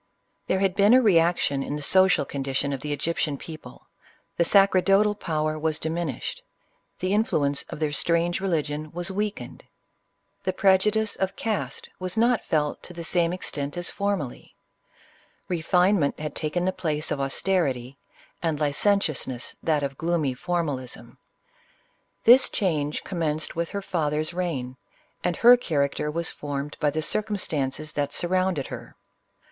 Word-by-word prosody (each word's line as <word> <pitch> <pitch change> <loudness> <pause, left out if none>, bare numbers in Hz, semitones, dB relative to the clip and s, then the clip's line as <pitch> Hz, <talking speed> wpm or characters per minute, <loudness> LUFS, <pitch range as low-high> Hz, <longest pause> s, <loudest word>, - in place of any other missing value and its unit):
There 190 - +2
had 195 -2 +2
been 205 +4 +5
a - - +8
reaction 170 - +3
in 145 - -3
the 150 - -5
social 185 -3 +4
condition 135 0 -2
of 135 - -4
the 150 - -4
Egyptian 150 -1 -1
people 155 +2 -11 0.3
— - - -40
the 170 - +4
sacerdotal 195 +2 +4
power 155 -5 -2
was 155 0 0
dimin 160 -4 -2
ished— - - -5 0.6
the 185 +2 -1
influence 145 -10 +1
of - - -7
their 155 -2 0
strange 170 +4 +1
religion 155 -4 -2
was 175 +2 -3
weakened 205 +1 -4 0.4
— - - -47
the 185 - 0
prejudice 205 +3 +3
of 190 0 -2
caste 220 -3 -3
was 185 +2 -4
not' 235 +1 +3
felt 150 -2 0
to 180 - -7
the 170 -1 -7
same 170 0 +1
extent 145 -4 -4
as 175 - -1
formerly 200 -10 -3 0.5
— - - -32
refinement 180 -1 +2
had 150 -1 -4
taken 165 +4 -1
the 185 - +2
place 155 -4 -2
of 140 - -1
austerity, 135 -4 -1 0.4
and 160 -3 -1
licentiousness 150 - 0
that 155 -3 +1
of 135 -1 -4
gloomy 165 -5 0
formalism. 145 -5 -4 1.0
This 250 +3 +7
change 155 -6 -1
commenced 160 -4 -2
with 170 0 -1
her 200 -1 -4
father's 155 -4 -1
reign, 140 -8 -3 0.5
and 175 -1 0
her 240 +1 +8
character 150 - -1
was 165 +2 -2
formed 145 0 -5
by 150 - +2
the 155 +2 -2
circum 210 +4 -1
stances 155 -3 -2
that 145 -1 -1
surrounded 185 -4 +1
her. - - -9
165 Hz, 150 wpm, -25 LUFS, 145-190 Hz, 1.0 s, a